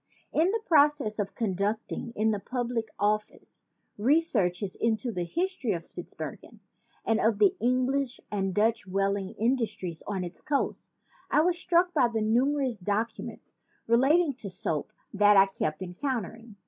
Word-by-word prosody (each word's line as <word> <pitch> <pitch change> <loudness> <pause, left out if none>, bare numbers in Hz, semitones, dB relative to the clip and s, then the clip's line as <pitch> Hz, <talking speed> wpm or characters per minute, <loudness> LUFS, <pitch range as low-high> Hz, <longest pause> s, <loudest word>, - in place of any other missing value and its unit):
In 330 +4 +3
the 445 +2 -1
process 290 -8 +3
of 200 -1 -2
conducting, 215 +3 -2
in 220 +1 +2
the 210 - -1
Public 245 0 -2
Record 215 - -26
Office, 210 0 -3 0.3
researches 210 - +1
into 230 +1 0
the 180 -4 -3
history 340 - -1
of 170 -1 -5
Spitzbergen - - -8 0.5
and 225 0 +2
of 220 -1 +2
the 205 -2 +4
English 255 +2 +1
and 195 -2 -1
Dutch 220 +2 +1
whaling 195 0 -1
industries 215 -8 -1
on 195 -3 -2
its 175 0 -8
coasts, 285 -2 -2 0.4
I 300 - +4
was 350 +1 +1
struck 355 0 +2
by 265 -6 +4
the 225 -2 -1
numerous 255 +1 +1
documents 210 +5 -3 0.3
relating 280 +7 +4
to 205 - -7
soap 160 -4 -3 0.2
that 205 0 +5
I 195 - +8
kept 185 -3 -3
encountering. 225 +2 -4
225 Hz, 150 wpm, -28 LUFS, 200-265 Hz, 0.5 s, I